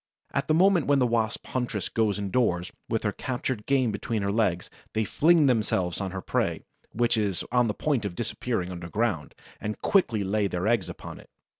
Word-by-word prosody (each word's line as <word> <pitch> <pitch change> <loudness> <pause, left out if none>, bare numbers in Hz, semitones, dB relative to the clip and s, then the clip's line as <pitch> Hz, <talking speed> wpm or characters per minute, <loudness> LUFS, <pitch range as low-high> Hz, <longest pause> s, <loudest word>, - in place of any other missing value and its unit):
At - - 0
the 155 - +3
moment 180 -2 +4
when 145 0 +4
the 130 - +3
Wasp 115 -2 0
huntress 120 -7 -2
goes 110 -3 +1
indoors, 100 -3 0 0.2
with 110 -1 0
her 105 - +1
captured 125 -1 -3
game 130 -4 +3
between 105 +1 -2
her 100 - 0
legs, 100 -5 +1 0.3
they 110 - +1
fling 160 +8 +4
themselves 105 -8 +1
on 95 - -2
her 95 0 -5
prey, - - -1 0.3
which 120 0 +1
is 100 -5 0
on 125 -1 +3
the 105 - -2
point 140 -7 0
of 100 -4 -4
disappearing 110 -3 -2
underground, 90 0 -2 0.2
and 105 0 -4
quickly 115 - +3
lay 100 +1 +1
their 90 -1 -2
eggs 110 -5 +2
upon - - -8
it. - - -16
110 Hz, 190 wpm, -27 LUFS, 100-125 Hz, 0.3 s, moment